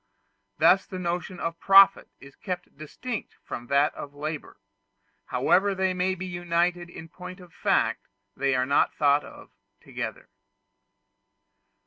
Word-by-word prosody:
Thus 195 - +4
the 185 - -7
notion 175 0 -3
of 165 0 -4
profit 195 0 +6
is 140 0 -15
kept 180 -1 -6
distinct 220 - -6
from 120 - -7
that 140 +4 +3
of 145 0 -9
labor; 150 -3 -6 0.7
however 195 +2 +2
they 190 0 0
may 185 +1 0
be 185 +1 -6
united 175 0 -1
in 165 -1 -10
point 180 +3 -10
of 180 -3 -15
fact, - - 0 0.3
they 135 -1 +1
are 125 0 +1
not 140 +2 +2
thought 145 0 +3
of - - -13 0.3
together. - - -7
175 Hz, 135 wpm, -26 LUFS, 150-185 Hz, 0.7 s, profit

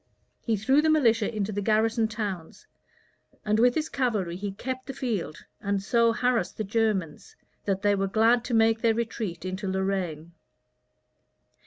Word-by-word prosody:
He 225 -2 -1
threw 265 +8 +3
the 315 - +2
militia 235 -9 +3
into 215 -2 -2
the 205 0 -2
garrison 220 +2 +2
towns; 205 -6 -5 0.8
and 215 +1 +2
with 245 +1 +4
his 315 0 0
cavalry 215 - -1
he 200 +2 -4
kept 260 +6 -6
the 270 - -6
field, 215 - -3 0.2
and 200 -1 0
so 230 +3 +2
harassed 245 +1 0
the 215 - -2
Germans, 215 - -1 0.3
that 195 0 -1
they 205 0 +4
were 195 0 0
glad 225 +4 +3
to 240 - -1
make 225 0 +3
their 225 -1 +3
retreat 220 -6 -4
into 185 +2 -4
Lorraine. 190 -4 -2
215 Hz, 160 wpm, -27 LUFS, 195-235 Hz, 0.8 s, with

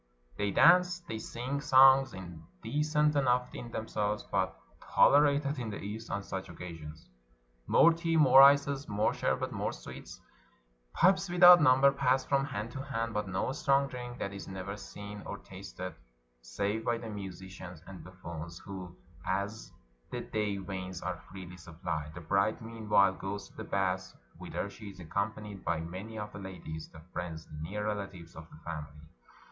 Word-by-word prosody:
They 100 0 -1
dance, 180 - +5
they 115 -10 -6
sing 130 +6 -4
songs, 135 -3 +6
indecent 145 - -1
enough 125 -3 +2
in 120 - -7
themselves, 105 -1 -2
but - - -1 0.4
tolerated 145 0 +5
in 120 -3 -3
the 100 - -5
East 110 +3 -6
on 100 0 -2
such 95 -1 -5
occasions. 80 -3 -9 0.6
More 165 - +6
tea, 165 0 0
more 135 -3 +8
ices, 140 0 +5
more 105 +1 +1
sherbet, - - -1
more - - -2
sweets. - - -10 0.7
Pipes 190 0 +3
without 175 0 +9
number 135 0 +6
pass 135 -1 +1
from 135 -1 +2
hand 110 -4 -4
to 130 - -5
hand, 115 -5 -3
but 105 -1 -1
no 95 +7 -1
strong 140 -1 +2
drink; 125 -2 -7
that 100 - -4
is 100 - -8
never 95 +1 -5
seen 105 0 -9
or - - -6
tasted, - - -8 0.5
save 100 - -2
by 120 0 +1
the 115 - -7
musicians 95 -3 -8
and 95 -2 -10
buffoons, 85 -2 -8
who 95 -3 -8 0.3
as 100 +4 -2 0.4
the - - -4
day 105 -2 -2
wanes 95 -2 -6
are 90 -1 -4
freely 90 -1 -9
suppUed. 80 -2 -5
The 90 - -7
bride 100 +6 +1
meanwhile 110 -4 +2
goes 95 +1 -6
to - - -23
the - - -5
bath, 95 -1 -1 0.2
whither - - -4
she 100 +1 -10
is 95 -1 -13
accompanied 100 +3 -4
by 85 -2 0
many 95 +7 -7
of 105 0 -6
the 100 - -7
ladies, 90 -5 -7
the 80 - -13
friends 85 -2 -5
and 75 - -9
near 105 +6 -4
relatives 95 -5 -5
of 80 0 -10
the - - -14
family. 75 -2 -7
105 Hz, 165 wpm, -31 LUFS, 90-130 Hz, 0.7 s, without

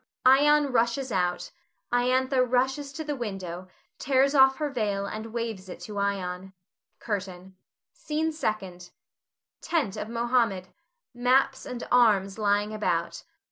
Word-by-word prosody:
[Ion 290 +2 +5
rushes 240 +2 0
out; 180 -2 -1 0.4
Iantha 255 +2 +2
rushes 265 +3 0
to 315 - -5
the 295 -1 -3
window, 190 -7 -6 0.3
tears 275 +1 +2
off 265 -1 +5
her 300 -2 -2
veil 205 -6 -1
and 215 +2 -6
waves 225 -5 -4
it - - -8
to 210 -2 -6
Ion.] 190 -1 -3 0.4
CURTAIN. 190 -3 -5 0.4
SCENE 320 -10 -2
SECOND. 190 - -4 0.7
[Tent 265 - -1
of 215 - -5
Mohammed; 230 -6 0 0.5
_maps 260 +2 +2
and 250 -1 -6
arms 210 -5 +3
lying 205 0 +1
about. 215 0 -1
230 Hz, 125 wpm, -27 LUFS, 195-265 Hz, 0.7 s, Ion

